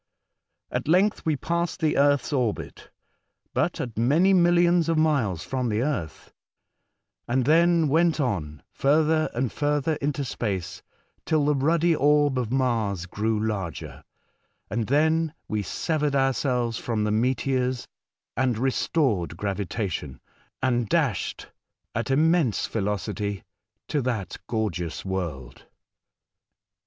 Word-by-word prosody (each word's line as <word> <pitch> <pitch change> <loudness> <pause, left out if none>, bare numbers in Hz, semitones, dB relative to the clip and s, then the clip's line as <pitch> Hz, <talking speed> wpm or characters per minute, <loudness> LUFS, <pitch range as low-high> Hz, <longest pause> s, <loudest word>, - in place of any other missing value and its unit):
At - - -3
length 185 +3 +2
we 155 - +2
passed 170 +5 -2
the 160 -3 +1
earth's 145 +1 +2
orbit, 125 -6 -2 0.6
but - - 0
at 120 - -4
manymilhons 175 - +4
of 165 - +2
miles 140 - +1
from 130 -2 -2
the 110 +2 0
earth, 115 - -4 0.9
and 130 +1 +1
then 165 +2 +4
went 165 +3 +2
on, 80 - -2
further 155 +2 +2
and 125 0 -1
further, 145 +1 0
into 145 -1 -2
space, 95 -6 -3 0.4
till 155 -3 +1
the 150 - +3
ruddy 165 +4 +2
orb 145 -2 +3
of 120 -2 -3
Mars 115 -8 0
grew 105 +4 -1
larger, 100 -6 -4 0.7
and 110 0 -1
then 160 +3 +2
we 105 -1 -1
severed 150 - -1
ourselves 130 -3 +1
from 110 -3 -2
the 105 - 0
meteors 125 +2 0 0.5
and 125 -2 +1
re 130 +3 +1
stored 105 - 0
gravitation 95 - -3 0.4
and 120 -4 +1
dashed - - -1 0.4
at 115 +3 -2
immense 155 - +2
velocity 105 -1 -3 0.4
to 145 - 0
that 115 -8 -3
gorgeous 100 -9 -3
world. 85 -10 -5
130 Hz, 120 wpm, -25 LUFS, 105-150 Hz, 0.9 s, manymilhons